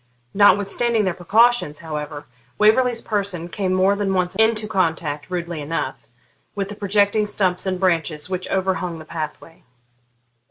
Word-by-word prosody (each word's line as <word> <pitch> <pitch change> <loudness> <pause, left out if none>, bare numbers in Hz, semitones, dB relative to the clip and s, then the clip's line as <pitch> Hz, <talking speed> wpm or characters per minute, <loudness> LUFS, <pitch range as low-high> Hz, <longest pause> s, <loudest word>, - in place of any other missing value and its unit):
Notwithstanding 205 +3 +3
their 185 - 0
precautions, 210 -2 +2
however, 150 -2 -6 0.3
Waverley's 230 +2 +3
person 195 -5 -2
came 190 0 -2
more 190 +2 +3
than 200 -1 -1
once 180 -1 0
into 220 -1 +3
contact, 160 -6 -1
rudely 170 -3 -4
enough, 145 -3 -4 0.5
with 200 -1 -3
the 205 - -6
projecting 205 +1 +1
stumps 190 -2 0
and 185 -1 -1
branches 165 -4 0
which 185 -1 -4
overhung 185 -3 -1
the 155 - -11
pathway. 160 +1 -7
185 Hz, 135 wpm, -21 LUFS, 165-205 Hz, 0.5 s, Notwithstanding